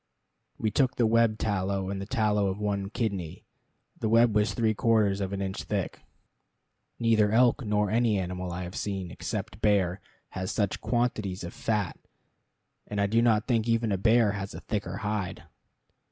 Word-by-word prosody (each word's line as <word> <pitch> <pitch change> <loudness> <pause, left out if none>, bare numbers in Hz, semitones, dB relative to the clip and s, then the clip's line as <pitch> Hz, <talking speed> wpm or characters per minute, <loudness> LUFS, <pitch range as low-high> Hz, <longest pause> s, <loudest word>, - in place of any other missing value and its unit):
We 110 -2 -1
took 130 +3 +2
the 120 - +2
web 115 -1 +3
tallow, 95 -2 -1
and 100 -1 -4
the 100 - -6
tallow 105 -4 +1
of 95 0 -2
one 100 -2 -2
kidney. 100 -8 -3 0.5
The 110 - -1
web 115 0 +5
was 105 +1 +1
three 110 -2 +2
quarters 105 -3 +2
of 95 -1 -2
an 100 0 -2
inch 95 0 -3
thick. - - -3 1.0
Neither 110 -3 +3
elk, 125 +4 +4
nor 105 -2 +1
any 115 -2 +2
animal 90 -1 -3
I 90 +1 -4
have 90 +1 -7
seen, 95 -4 -3
except 100 - -5
bear, 95 -3 +2 0.3
has 95 0 -4
such 105 -3 -1
quantities 110 -6 -1
of 85 - -6
fat, 105 -5 -2 0.9
and 105 - -3
I 100 - +3
do 115 +3 +2
not 115 -2 +3
think 115 -3 +1
even 115 -1 +1
a 100 - +1
bear 110 +1 +4
has 100 -1 -5
a - - -7
thicker 100 -4 -3
hide. 105 -4 -3
105 Hz, 175 wpm, -28 LUFS, 95-115 Hz, 1.0 s, web